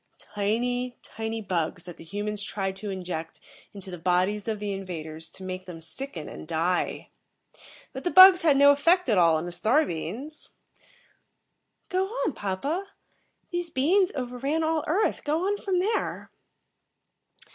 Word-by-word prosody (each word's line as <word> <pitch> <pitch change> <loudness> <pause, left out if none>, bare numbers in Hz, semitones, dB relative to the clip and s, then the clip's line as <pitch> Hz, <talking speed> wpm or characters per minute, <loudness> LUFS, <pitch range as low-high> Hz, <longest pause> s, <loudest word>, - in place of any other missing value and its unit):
"Tiny, 245 +4 -2
tiny 225 0 -5
bugs 175 -2 -2
that 175 -2 -10
the - - -11
humans 205 +4 -4
tried 195 -1 -3
to 210 +1 -5
inject 175 -4 -5 0.3
into 195 -2 -9
the 180 - -7
bodies 185 +5 +1
of 220 -2 -2
the 205 -1 -3
invaders 160 -4 -7
to 190 - -13
make 185 0 -6
them 170 -2 -8
sicken 165 - -6
and - - -9
die. 170 +2 -1 0.8
But - - -6
the 355 - +1
bugs 375 0 +9
had 300 -4 +4
no 285 +1 +8
effect 335 +3 +3
at 210 -5 +4
all 165 -2 +5
on 160 - -3
the 175 - -5
star 240 - +2
beings." 225 - -6 1.4
"Go 375 +1 +1
on, 425 - -2
papa. 275 - -3 0.6
These 350 -1 -2
beings 360 +8 +3
over 250 -2 -4
ran 295 +5 0
all 315 -1 +1
Earth. 375 +8 +1
Go 315 +4 0
on 405 +1 0
from 380 -2 -1
there." 410 +5 -1
215 Hz, 155 wpm, -27 LUFS, -, 1.4 s, bugs